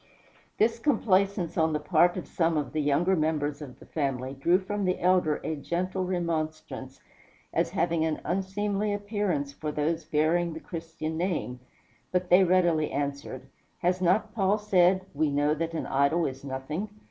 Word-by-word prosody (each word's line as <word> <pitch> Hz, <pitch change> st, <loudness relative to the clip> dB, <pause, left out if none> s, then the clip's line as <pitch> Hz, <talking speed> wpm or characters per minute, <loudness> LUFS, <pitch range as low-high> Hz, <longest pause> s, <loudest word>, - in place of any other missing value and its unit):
This 230 Hz, +1 st, +2 dB
complaisance 200 Hz, -, +1 dB
on 160 Hz, 0 st, +2 dB
the 150 Hz, -, 0 dB
part 175 Hz, +4 st, +3 dB
of 180 Hz, -, -5 dB
some 165 Hz, -2 st, +1 dB
of 140 Hz, -3 st, -2 dB
the 155 Hz, -, 0 dB
younger 155 Hz, +6 st, +2 dB
members 155 Hz, -2 st, -1 dB
of 135 Hz, -4 st, -9 dB
the -, -, -15 dB
family 135 Hz, -3 st, -2 dB
drew 170 Hz, +7 st, +3 dB
from 200 Hz, +2 st, -3 dB
the 185 Hz, 0 st, 0 dB
elder 180 Hz, -4 st, +3 dB
a 160 Hz, -, -2 dB
gentle 185 Hz, +5 st, -2 dB
remonstrance, 155 Hz, -6 st, -3 dB, 0.5 s
as -, -, +1 dB
having 165 Hz, -1 st, 0 dB
an 160 Hz, -1 st, -1 dB
unseemly 205 Hz, +2 st, -1 dB
appearance 205 Hz, -9 st, -2 dB
for 150 Hz, +1 st, -4 dB
those 155 Hz, +2 st, -1 dB
bearing 160 Hz, +3 st, +1 dB
the 160 Hz, -, -6 dB
Christian 165 Hz, -1 st, -5 dB
name; 165 Hz, -8 st, -2 dB, 0.5 s
but 180 Hz, -1 st, -1 dB
they 185 Hz, +2 st, +7 dB
readily 175 Hz, -4 st, +3 dB
answered, 140 Hz, -2 st, -4 dB, 0.4 s
"Has 180 Hz, +1 st, +1 dB
not 200 Hz, +4 st, +2 dB
Paul 200 Hz, -1 st, +2 dB
said, 185 Hz, -3 st, +3 dB
'We 150 Hz, +1 st, +1 dB
know 145 Hz, +1 st, +2 dB
that 165 Hz, +2 st, -3 dB
an -, -, -2 dB
idol 140 Hz, +5 st, +2 dB
is 135 Hz, 0 st, -5 dB
nothing'? 140 Hz, +9 st, -4 dB
165 Hz, 165 wpm, -28 LUFS, 150-185 Hz, 0.5 s, they